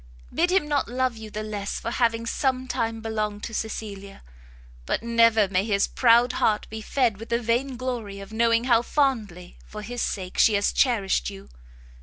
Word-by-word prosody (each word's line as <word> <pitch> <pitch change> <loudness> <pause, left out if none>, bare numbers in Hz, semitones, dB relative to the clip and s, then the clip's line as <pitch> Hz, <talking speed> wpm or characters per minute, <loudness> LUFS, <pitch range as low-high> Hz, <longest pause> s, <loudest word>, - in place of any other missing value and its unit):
Bid 345 +2 +2
him 370 -4 +2
not 290 -1 0
love 255 0 0
you 220 -1 -9
the 215 +1 -5
less 205 -2 -4
for 230 - -4
having 230 -2 +1
some 260 +2 -1
time 225 -2 -2
belonged 215 -2 -3
to 225 - -5
Cecilia; 205 - -6 0.6
but - - -1
never 230 -2 +4
may 185 0 +1
his 200 -2 +1
proud 240 0 +4
heart 210 -1 +1
be 220 0 -5
fed 235 -3 0
with 225 +2 -10
the 235 0 +1
vain 245 +3 -1
glory 235 -6 -4
of 195 +2 -10
knowing 230 +1 +3
how 240 -2 +4
fondly 220 -11 -1
for 210 0 -9
his 245 +3 -5
sake 185 -2 -3
she 220 - +5
has 200 - +1
cherished 200 - +1
you! 65 +1 -11
225 Hz, 185 wpm, -25 LUFS, 210-245 Hz, 0.6 s, she